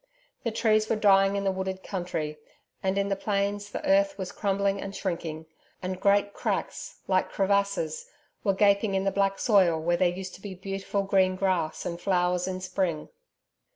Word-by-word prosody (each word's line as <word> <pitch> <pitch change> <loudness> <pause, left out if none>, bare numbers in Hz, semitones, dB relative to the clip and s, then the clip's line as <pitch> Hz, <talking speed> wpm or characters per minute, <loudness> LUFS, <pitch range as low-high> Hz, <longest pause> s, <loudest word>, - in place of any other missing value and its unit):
The 230 - 0
trees 215 -1 +2
were - - +2
dying 195 -2 +4
in 200 - -1
the 195 - +2
wooded 190 0 -4
country; 165 -5 -4 0.4
and 190 +1 0
in 200 0 +1
the 195 - +1
plains 200 0 -1
the 300 - -5
earth 295 0 +3
was 185 -2 -4
crumbling 200 -1 0
and 195 0 -6
shrinking, 165 -4 -4 0.3
and 185 0 -4
great 200 0 +3
cracks - - -3
like 185 -1 +2
crevasses 200 -5 0 0.4
were 195 -2 +2
gaping 200 0 +3
in 190 - +1
the 195 - +1
black 195 0 +1
soil 185 -7 +4
where 175 +2 +1
there 180 0 +3
used 185 +1 -6
to - - -12
be 200 -2 -7
beautiful 195 +1 -3
green 190 -1 +3
grass 185 -4 -1
and 170 0 -4
flowers 180 -1 +1
in 185 0 -3
spring. 180 -4 -2
195 Hz, 180 wpm, -27 LUFS, 185-200 Hz, 0.4 s, dying